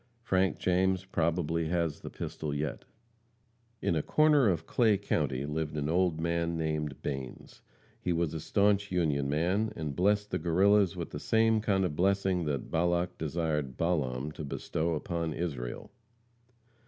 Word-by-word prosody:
Frank 95 -4 +1
James 95 +1 +1
probably 85 -2 0
has 85 -2 -1
the - - -7
pistol 75 -2 -5
yet. 75 +1 -3 1.0
In 85 - +1
a 80 - +1
corner 150 - +4
of 85 -3 -1
Clay 110 -4 +3
county 70 -9 -1
lived 75 0 -3
an 75 0 -1
old 85 -1 +2
man 85 0 0
named 75 -3 -2
Banes. 65 -2 -6 0.4
He 90 - -1
was 85 -2 0
a 80 - -3
staunch 100 +3 +2
Union 75 -6 +1
man, 90 +9 +1
and 75 -4 -4
blessed 105 +3 +1
the - - 0
Guerrillas 95 +2 +3
with 85 -2 -5
the 75 - -5
same 110 +4 +3
kind 95 -3 +1
of 80 -5 -2
blessing 95 -1 +1
that 70 -2 -3
Balak 85 +2 0
desired 75 -4 -2
Balaam 75 -5 -1
to 75 - -7
bestow 80 +3 -2
upon 85 0 -2
Israel. 70 -9 -4
85 Hz, 155 wpm, -30 LUFS, 75-95 Hz, 1.0 s, corner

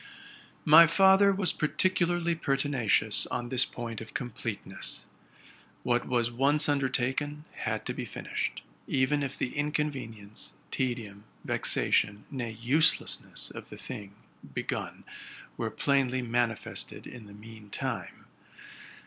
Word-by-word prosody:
My 165 +2 +9
father 195 +3 +6
was 195 -2 +1
particularly 175 +1 +1
pertinacious 135 -8 +1
on 120 -1 -3
this 130 -1 +5
point 115 -2 -6
of 110 - -10
completeness. 110 -5 -5 0.8
What 120 0 +1
was 120 -1 +1
once 140 +5 +3
undertaken 140 +2 0
had - - -3
to - - -2
be - - -4
fin - - -8
ished, - - -2 0.3
even 140 +2 +2
if 140 -1 -3
the 125 - -2
inconvenience, 135 -8 -3 0.2
tedium, 110 -5 -3 0.2
vexation, 100 +1 +1
nay, 120 -5 -4
uselessness, 145 +8 +2
of - - -9
the - - -9
thing 100 -1 -8 0.4
begun - - -4 0.5
were - - -2
plainly 130 -2 +1
manifested 120 -2 -2
the 120 - -9
mean 105 0 -12
time. 115 -5 -4
130 Hz, 115 wpm, -29 LUFS, 115-150 Hz, 0.8 s, My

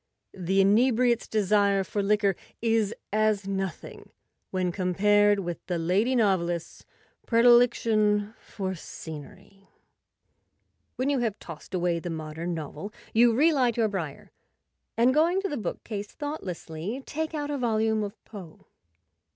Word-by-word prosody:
The 190 +1 +1
inebriate's 235 +4 +3
desire 200 -2 +2
for 205 +2 -2
liquor 200 -1 +2 0.2
is 225 -3 +1 0.2
as 215 -2 +1
nothing 195 -4 -5 0.4
when 185 -1 -1
compared 205 +3 +3
with 175 -2 -5
the 180 -2 -1
lady 195 +10 +1
novelist's 175 -7 0 0.4
predilection 230 -3 +4
for 190 -2 -5
scenery. 160 +4 -11 1.3
When 265 +3 0
you 275 - +1
have 225 -4 -1
tossed 165 +3 -9
away 175 -1 0
the 175 - -6
modern 160 +2 -4
novel 160 +5 -6 0.2
you 230 0 +5
re 315 +6 +4
light 250 -5 +1
your 225 -2 +2
briar, 170 -8 -5 0.7
and, 240 +3 +4
going 335 +5 +3
to - - 0
the 295 - -3
bookcase 210 0 -5
thoughtlessly, 205 - -6
take 315 +1 -3
out 295 -1 -3
a 290 - -1
volume 220 -2 +1
of 205 0 -4
Poe. 190 -7 -11
205 Hz, 130 wpm, -27 LUFS, 185-235 Hz, 1.3 s, you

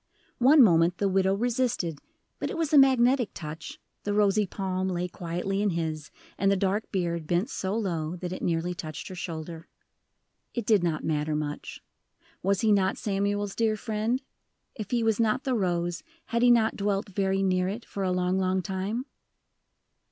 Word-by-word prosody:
One 270 +3 +7
moment 170 -3 +4
the 200 - +1
widow 190 0 +2
resisted, 230 - -1 0.4
but - - -2
it - - -4
was 320 -2 -1
a - - +7
magnetic 255 -2 +4
touch, 155 0 -7 0.2
the 205 0 -1
rosy 205 0 +3
palm 190 -1 -2
lay 180 -1 -1
quietly 180 +3 -3
in 205 - +2
his, 160 -3 -3 0.3
and 195 +1 +3
the - - +4
dark 195 +3 -1
beard 170 -4 -2
bent 175 +6 0
so 190 +2 -2
low 170 -6 -2
that 180 0 -5
it - - -6
nearly 170 +1 0
touched 155 -3 -7
her 185 - -7
shoulder. 165 -1 -6 0.9
It 235 -3 -2
did 210 -5 +4
not 165 -3 -1
matter 150 -1 0
much. 150 -1 -5 0.6
Was 195 +1 +1
he 220 - +3
not 195 -1 +2
Samuel's 205 0 -1
dear 225 -2 +1
friend? 225 +4 -1 0.5
If 215 -5 -7
he 240 -2 +1
was 225 -1 +1
not 225 +3 +2
the 260 - 0
rose, 175 -5 -1 0.2
had 235 0 -1
he 245 - +6
not 230 -2 +4
dwelt 200 0 -1
very 195 0 0
near 185 -1 +2
it, 215 +5 -5
for 200 - -6
a 185 -1 +1
long, 180 +1 +1
long 185 0 +1
time? 200 +6 -3
195 Hz, 180 wpm, -27 LUFS, 175-215 Hz, 0.9 s, One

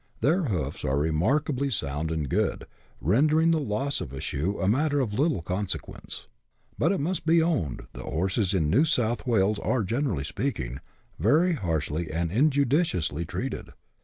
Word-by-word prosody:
Their 170 +5 +2
hoofs 80 - -2
are 65 - +1
remarkably 125 - +1
sound 75 - 0
and 80 -3 -2
good, - - 0 0.3
rendering 155 - +3
the 160 - +3
loss 135 +2 -1
of 65 - -6
a 70 - -5
shoe 85 +11 -2
a 95 - 0
matter 145 +7 +2
of 120 -6 -1
little 140 - +1
consequence. 95 +3 -4 0.5
But 165 - +2
it 195 - 0
must 170 +6 -1
be 165 +1 +4
owned 150 - 0
that - - -8
horses 95 +4 0
in 80 -5 +2
New 115 - +4
South 120 -6 0
"Wales 105 -3 +2
are, 125 0 0
generally 115 - -1
speaking, 70 - -3 0.4
very 170 +4 +4
harshly 80 - -2
and 85 +1 -1
injudiciously 130 - +2
treated. - - -5
110 Hz, 160 wpm, -27 LUFS, -, 0.5 s, be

